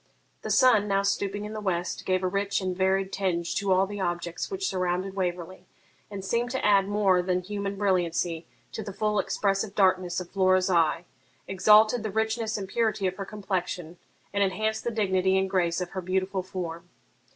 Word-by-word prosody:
The - - -6
sun, 225 -5 +5
now 195 0 +1
stooping 200 +1 -1
in 210 - -6
the 215 - -5
west, 180 -3 -2
gave 185 0 +1
a - - +2
rich 200 +2 0
and 185 -2 -2
varied 190 +1 +1
tinge 175 -3 -1
to 200 -1 0
all 185 +1 +4
the 205 +1 -7
objects 175 -1 -3
which 385 -1 -2
surrounded 185 +1 -1
Waverley, 180 -1 -4 0.4
and 200 -2 -7
seemed 235 +4 0
to 260 +1 -2
add 200 -2 +4
more 200 -3 +3
than 180 0 0
human 200 +1 -4
brilliancy 175 -4 0 0.2
to - - -5
the 200 -2 -7
full 210 +1 0
expressive 195 +1 -1
darkness 185 -2 +2
of 180 -1 -8
Flora's 185 -1 +3
eye, 170 0 +2 0.4
exalted 215 +4 +5
the 215 - -3
richness 220 +1 -1
and 195 -2 -5
purity 215 -1 0
of 185 0 -1
her 195 - -4
complexion, 180 -4 -4 0.3
and 200 - 0
enhanced 215 +3 -1
the - - +1
dignity 190 -4 +1
and 190 0 0
grace 175 -3 +1
of 180 - -4
her 190 - -4
beautiful 190 +1 -1
form. 175 -2 -6
190 Hz, 185 wpm, -27 LUFS, 185-205 Hz, 0.4 s, sun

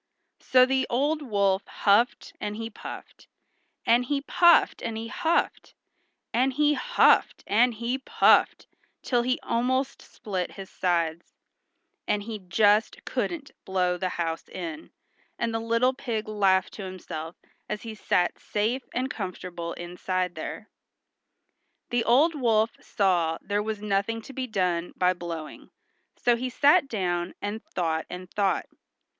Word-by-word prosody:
So 255 0 +5
the 265 0 +1
old 290 +6 +1
wolf 200 -6 +1
huffed 210 +4 +2
and 210 0 -3
he 225 +1 -5
puffed, - - -10 0.6
and 235 +2 +4
he 280 +2 -1
puffed 345 +4 +4
and 225 -1 -3
he 225 +1 -5
huffed, 335 -1 -1 0.6
and 255 +3 +3
he 295 +2 +3
+HUFFED - - +3
AND 235 +3 +3
HE 240 +4 -2
PUFFED+ - - +3 0.4
till 245 -2 +2
he 255 +2 0
almost 260 +3 0
split 190 -5 -5
his 195 -1 -9
sides, 170 -2 -1 0.7
and 205 -1 0
he 215 0 -6
just 205 +3 +2
couldn't 320 -5 -3
blow 180 -1 0
the 185 +1 -2
house 165 -1 -2
in, 320 -1 -6 0.5
and 230 -1 -1
the 225 - 0
little 230 +3 +2
pig 235 -5 -4
laughed 195 -3 +2
to 205 - -7
himself 175 -3 -7 0.3
as 210 -1 -4
he 225 -1 -6
sat 180 -4 0
safe 220 +5 -1
and 255 +2 -1
comfortable 180 -4 -5
inside 180 +1 -3
there. - - -7 1.2
The 240 -1 +2
old 285 +8 +5
wolf 225 -5 +2
saw 175 -5 +1
there 205 +1 -1
was 210 -1 -4
nothing 210 +2 -1
to 270 - -11
be 260 0 -3
done 180 -5 -1
by 180 0 +3
blowing, 170 -3 -7 0.5
so 240 - +3
he 255 +2 -3
sat 290 +5 +4
down 180 -6 -2
and 205 +2 -4
thought 160 -3 -2
and 180 0 -8
thought. 200 -2 +1
215 Hz, 140 wpm, -26 LUFS, 185-250 Hz, 1.2 s, So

